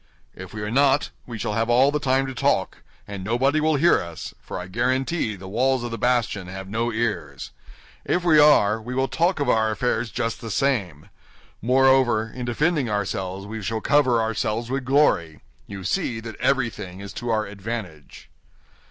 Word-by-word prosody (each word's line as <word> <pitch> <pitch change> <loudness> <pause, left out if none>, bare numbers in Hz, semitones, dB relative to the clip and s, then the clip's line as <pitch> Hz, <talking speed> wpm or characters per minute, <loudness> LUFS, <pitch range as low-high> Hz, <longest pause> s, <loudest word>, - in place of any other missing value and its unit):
If 95 -1 -10
we 105 -1 -6
are 105 - -3
not, 140 +2 +3 0.2
we 120 -2 -6
shall 105 0 -3
have 115 +2 0
all 130 +4 +5
the 150 - -1
time 135 -1 +1
to 135 - -5
talk, 125 - 0 0.3
and 100 -2 -6
nobody 130 +8 +1
will 155 0 +2
hear 170 +5 +4
us—for 85 -2 -8
I 90 - -6
guarantee 125 - -1
the 95 0 -10
walls 125 +5 +1
of 120 - -4
the 115 - -4
bastion 120 -6 0
have 95 +1 -7
no 115 +4 -1
ears; 105 - -3 0.5
if 180 - 0
we 160 -3 +5
are, 115 -8 +5
we 125 +3 -6
will 135 +1 +1
talk 170 +3 +1
of 145 - 0
our 110 -2 +3
affairs 120 +1 -1
just 115 +3 -3
the 115 - -6
same. 100 - -1 0.5
Moreover, 125 -2 +3
in 125 -1 -5
defending 145 +2 0
ourselves, 95 -2 -3
we 110 +1 -6
shall 110 +2 -2
cover 130 -1 +3
ourselves 115 +1 -2
with 135 -1 -2
glory. 125 - +2 0.3
You 100 -2 -8
see 125 - -1
that 115 -1 -8
everything 105 -9 -1
is 100 0 -8
to 120 +3 -5
our 110 -1 +1
advantage." 100 -6 -7
115 Hz, 180 wpm, -23 LUFS, 100-135 Hz, 0.5 s, all